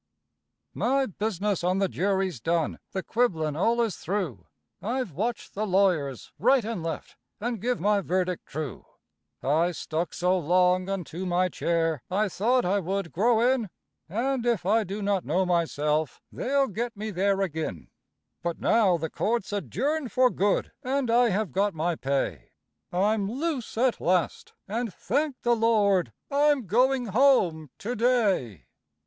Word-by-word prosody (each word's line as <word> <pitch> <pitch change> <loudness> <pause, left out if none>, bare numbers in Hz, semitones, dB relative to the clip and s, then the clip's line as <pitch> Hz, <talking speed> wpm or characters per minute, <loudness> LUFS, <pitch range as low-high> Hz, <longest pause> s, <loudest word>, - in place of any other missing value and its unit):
My 270 +2 +1
business 205 -3 -2
on 180 +2 +2
the 195 0 +2
jury's 190 -5 -1
done 165 +6 -1
the 190 - -3
quibblin' 165 -11 0
all 230 +8 +2
is 220 -6 -2
through 170 - -3 0.3
I've 245 -1 -2
watched 220 +10 -3
the 215 +2 -2
lawyers 180 - +1
right 250 +1 +4
and 225 -5 -3
left, 165 0 -5 0.2
and 230 -1 -3
give 245 +2 0
my 205 +2 +2
verdict 180 -1 -1
true; 150 -7 -5 0.6
I 160 +6 +2
stuck 165 +1 -3
so 180 +1 +2
long 180 +3 +2
unto 185 -1 -4
my 180 +1 +2
chair, 165 -4 0
I 205 +3 +1
thought 240 +6 +1
I 195 +3 +2
would 195 -1 -3
grow 225 +5 +3
in; 235 -6 -3 0.4
And 245 +6 -1
if 235 -7 0
I 220 +3 +3
do 200 +2 -5
not 200 -2 +1
know 190 +1 +1
myself, 155 -4 0
they'll 275 +1 +1
get 230 +2 -4
me 215 +1 -4
there 195 +1 +1
ag'in; 160 - -3 0.5
But 170 -1 -3
now 200 -6 +3
the 160 -1 -4
court's 220 -2 -1
adjourned 250 - -2
for 255 -1 +4
good, 200 +1 0
and 260 -2 -1
I 240 0 +5
have 205 0 -1
got 200 -1 0
my 165 +3 0
pay; 135 - -2 0.4
I'm 200 +2 +1
loose 275 -3 -3
at 250 +1 +2
last, 180 -1 0
and 225 +2 -2
thank 275 - -1
the 240 0 +3
Lord, 205 - +2 0.2
I'm 285 -3 +3
going 250 +6 +2
home 190 - +3
to 240 +4 -4
day. 210 - +1
200 Hz, 155 wpm, -27 LUFS, 175-235 Hz, 0.6 s, I